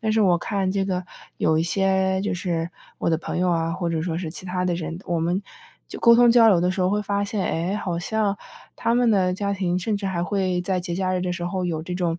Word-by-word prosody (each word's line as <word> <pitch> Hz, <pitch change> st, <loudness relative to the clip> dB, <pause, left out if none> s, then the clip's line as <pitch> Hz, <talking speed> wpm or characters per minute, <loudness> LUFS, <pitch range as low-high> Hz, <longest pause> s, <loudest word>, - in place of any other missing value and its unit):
但 220 Hz, -1 st, 0 dB
是 220 Hz, -, +2 dB
我 185 Hz, -4 st, +4 dB
看 190 Hz, +1 st, -1 dB
这 195 Hz, 0 st, 0 dB
个 185 Hz, -1 st, -1 dB, 0.4 s
有 155 Hz, -, +2 dB
一 160 Hz, -, +2 dB
些 190 Hz, +1 st, +1 dB
就 205 Hz, -, -1 dB
是 170 Hz, -2 st, -2 dB, 0.3 s
我 -, -, -1 dB
的 165 Hz, -, +3 dB
朋 165 Hz, -, -4 dB
友 180 Hz, 0 st, +2 dB
啊， 165 Hz, -1 st, 0 dB
或 175 Hz, 0 st, -2 dB
者 165 Hz, -1 st, -1 dB
说 165 Hz, -1 st, -2 dB
是 170 Hz, -3 st, -4 dB
其 185 Hz, -, -9 dB
他 180 Hz, 0 st, -2 dB
的 175 Hz, -, +1 dB
人， 165 Hz, 0 st, -5 dB
我 170 Hz, -2 st, 0 dB
们 175 Hz, +4 st, 0 dB, 0.5 s
就 -, -, -7 dB
沟 235 Hz, -, +6 dB
通 240 Hz, 0 st, +6 dB
交 230 Hz, -1 st, +7 dB
流 180 Hz, -4 st, +4 dB
的 180 Hz, +1 st, +2 dB
时 185 Hz, 0 st, -1 dB
候 180 Hz, -, +2 dB
会 210 Hz, -, +1 dB
发 200 Hz, 0 st, -1 dB
现， 200 Hz, -1 st, -2 dB
诶， 170 Hz, +4 st, -1 dB
好 180 Hz, -5 st, -2 dB
像 205 Hz, +2 st, 0 dB, 0.4 s
他 230 Hz, -, +1 dB
们 245 Hz, -1 st, +3 dB
的 185 Hz, -3 st, +2 dB
家 200 Hz, +1 st, -1 dB
庭 180 Hz, -2 st, 0 dB
甚 205 Hz, +3 st, -1 dB
至 200 Hz, -, -6 dB
还 175 Hz, -3 st, -1 dB
会 185 Hz, -1 st, 0 dB
在 185 Hz, 0 st, -1 dB
节 175 Hz, -1 st, -4 dB
假 185 Hz, 0 st, 0 dB
日 180 Hz, -, -1 dB
的 180 Hz, -1 st, -1 dB
时 175 Hz, 0 st, -3 dB
候 185 Hz, 0 st, -2 dB
有 160 Hz, -3 st, -2 dB
这 180 Hz, +2 st, -5 dB
种， 175 Hz, -2 st, -1 dB
185 Hz, 290 characters per minute, -23 LUFS, 175-200 Hz, 0.5 s, 交